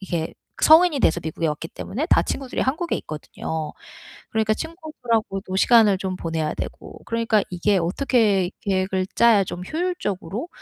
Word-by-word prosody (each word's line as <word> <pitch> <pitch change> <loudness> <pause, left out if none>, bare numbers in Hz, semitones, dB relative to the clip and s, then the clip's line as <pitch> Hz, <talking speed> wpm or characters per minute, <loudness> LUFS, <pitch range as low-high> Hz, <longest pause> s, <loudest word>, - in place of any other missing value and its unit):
이게 170 -4 -3 0.3
성인이 320 -2 +6
돼서 175 -5 +3
미국에 160 +1 -2
왔기 150 +2 -4
때문에 280 +10 -4
다 - - +4
친구들이 265 -2 -3
한국에 315 +6 0
있거든요. 155 0 -5 0.6
그러니까 220 0 +1
친구들하고도 235 - -3
시간을 215 -3 +5
좀 185 -1 -3
보내야 165 -3 -2
되고 - - -7
그러니까 230 -2 +1
이게 185 +2 +1
어떻게 195 0 +1
계획을 190 -1 0
짜야 225 -4 +5
좀 180 0 -6
효율적으로 310 - -3
205 Hz, 375 characters per minute, -23 LUFS, 180-255 Hz, 0.6 s, 성인이